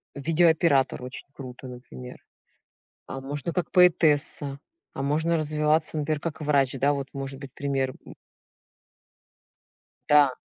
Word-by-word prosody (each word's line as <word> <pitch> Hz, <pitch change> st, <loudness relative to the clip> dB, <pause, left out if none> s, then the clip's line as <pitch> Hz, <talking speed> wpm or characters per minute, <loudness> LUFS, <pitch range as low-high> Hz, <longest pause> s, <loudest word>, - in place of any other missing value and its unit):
видеооператор 160 Hz, -3 st, +2 dB
очень 125 Hz, +1 st, -7 dB
круто, 130 Hz, -1 st, -9 dB
например. 120 Hz, -, -10 dB, 0.9 s
А 135 Hz, -, -6 dB
можно 145 Hz, +4 st, -4 dB
как 180 Hz, -, -2 dB
поэтесса, 150 Hz, -5 st, +3 dB, 0.3 s
а -, -, -5 dB
можно 160 Hz, +4 st, +1 dB
развиваться, 155 Hz, +1 st, +1 dB
например, 150 Hz, 0 st, -1 dB
как 160 Hz, 0 st, -5 dB
врач. 140 Hz, -3 st, +2 dB
Да, 140 Hz, +2 st, +3 dB
вот 140 Hz, -1 st, -4 dB
может 135 Hz, -1 st, -6 dB
быть 140 Hz, -2 st, -9 dB
пример, 135 Hz, -2 st, -1 dB
м. -, -, -12 dB, 1.9 s
Да. 145 Hz, -3 st, +6 dB
145 Hz, 120 wpm, -26 LUFS, 135-155 Hz, 1.9 s, Да